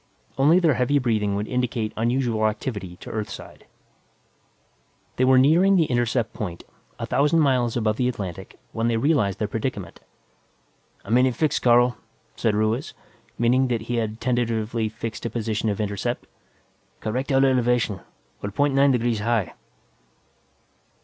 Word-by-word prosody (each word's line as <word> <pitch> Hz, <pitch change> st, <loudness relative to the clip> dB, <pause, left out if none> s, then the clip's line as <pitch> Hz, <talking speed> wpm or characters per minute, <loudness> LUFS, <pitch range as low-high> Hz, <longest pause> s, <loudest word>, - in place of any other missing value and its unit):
Only 145 Hz, +6 st, +4 dB
their 165 Hz, -5 st, +3 dB
heavy 130 Hz, +3 st, +1 dB
breathing 110 Hz, -6 st, 0 dB
would 105 Hz, +1 st, -3 dB
indicate 120 Hz, -3 st, -2 dB
unusual 115 Hz, -1 st, +1 dB
activity 105 Hz, -4 st, -4 dB
to -, -, -8 dB
Earthside. 105 Hz, -2 st, -7 dB, 1.5 s
They 130 Hz, -, +3 dB
were 130 Hz, 0 st, +5 dB
nearing 170 Hz, +9 st, +5 dB
the 170 Hz, -4 st, +4 dB
intercept 120 Hz, -3 st, 0 dB
point, 90 Hz, -5 st, -6 dB, 0.3 s
a -, -, -4 dB
thousand 150 Hz, +3 st, +2 dB
miles 125 Hz, -5 st, +1 dB
above 110 Hz, -2 st, 0 dB
the 125 Hz, -, +1 dB
Atlantic, 95 Hz, -8 st, -7 dB
when 115 Hz, +1 st, -1 dB
they 115 Hz, -1 st, +1 dB
realized 115 Hz, -, +1 dB
their -, -, -1 dB
predicament. -, -, -4 dB, 1.1 s
"I'm 115 Hz, +5 st, +3 dB
in 130 Hz, -, +4 dB
a -, -, +1 dB
fix, 145 Hz, +5 st, 0 dB
Carl," 120 Hz, 0 st, +4 dB, 0.4 s
said 110 Hz, -3 st, 0 dB
Ruiz, 110 Hz, +7 st, -1 dB, 0.4 s
meaning 125 Hz, +3 st, +3 dB
that 120 Hz, -3 st, -1 dB
he 120 Hz, +2 st, -3 dB
had 110 Hz, -1 st, -2 dB
tentatively 115 Hz, -2 st, -1 dB
fixed 110 Hz, +1 st, -5 dB
a -, -, -4 dB
position 110 Hz, -1 st, -2 dB
of 100 Hz, -, -2 dB
intercept. 105 Hz, +3 st, -3 dB, 0.7 s
"Correct 130 Hz, +6 st, -3 dB
our 135 Hz, 0 st, +4 dB
elevation; 125 Hz, -5 st, +1 dB, 0.4 s
we're 100 Hz, -, -3 dB
point 145 Hz, +7 st, +1 dB
nine 140 Hz, +1 st, +4 dB
degrees 120 Hz, -3 st, +1 dB
high." 110 Hz, -4 st, 0 dB
120 Hz, 150 wpm, -24 LUFS, 110-130 Hz, 1.5 s, were